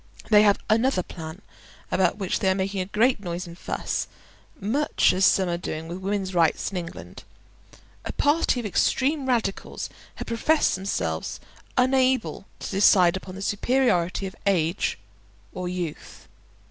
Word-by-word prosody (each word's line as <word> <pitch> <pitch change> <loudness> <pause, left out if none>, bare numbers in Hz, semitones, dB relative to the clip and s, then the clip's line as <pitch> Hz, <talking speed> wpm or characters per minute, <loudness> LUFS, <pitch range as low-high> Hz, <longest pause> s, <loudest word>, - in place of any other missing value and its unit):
They 210 -1 +8
have 205 -1 +5
another 225 -2 +2
plan 160 +3 -9 0.5
about 185 +1 +2
which 195 -4 -1
they 190 - +2
are 190 - +2
making 195 0 -1
a - - -2
great 225 +5 +2
noise 175 -1 -4
and 170 -1 -10
fuss, - - -3 0.5
much 255 +10 +2
as 185 0 +4
some 190 -1 +3
are 170 0 -1
doing 160 -2 -5
with 175 +2 -6
women's 195 0 -2
rights 170 +2 +2
in 190 - -4
England. 170 -1 -8 0.8
A - - -4
party 290 -3 +2
of 240 - -5
extreme 270 - +1
radicals 230 -6 -2 0.2
have - - -6
professed 300 +7 +2
themselves 85 - -3 0.4
unable 255 -4 +2
to - - -5
decide 190 -3 +5
upon 185 0 -7
the 195 - -6
superiority 200 -5 +1
of 190 - -6
age 175 -2 +1 0.6
or 180 -1 -4
youth. 175 -4 -6
195 Hz, 150 wpm, -25 LUFS, 180-230 Hz, 0.8 s, They